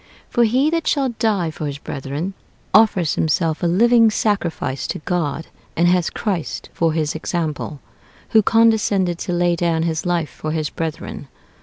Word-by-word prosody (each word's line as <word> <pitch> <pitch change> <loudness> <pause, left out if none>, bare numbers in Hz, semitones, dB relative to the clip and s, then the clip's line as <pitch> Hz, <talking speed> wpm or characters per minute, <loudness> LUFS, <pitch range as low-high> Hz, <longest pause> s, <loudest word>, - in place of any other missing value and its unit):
For 240 -2 +4
he 260 +7 +2
that 330 -1 -1
shall 275 -3 +2
die 200 -8 +1
for 155 -1 -5
his 140 -1 -4
brethren, 145 +6 -5 0.4
offers 195 -6 +4
himself 160 0 0
a 175 - +2
living 230 +5 +5
sacrifice 170 -11 -1
to - - -3
God, 165 -2 -2 0.3
and 170 +2 +4
has 180 -1 +2
Christ 190 -7 -3
for 165 -2 +1
his 155 -2 -1
example, 160 -3 -3 0.5
who 220 - +5
condescended 210 -5 +2
to 185 - -4
lay 175 0 +2
down 165 -1 0
his 160 -2 -1
life 175 -3 -1
for 155 0 -5
his 155 -2 -2
brethren. 160 -2 -5
175 Hz, 160 wpm, -20 LUFS, 160-210 Hz, 0.5 s, living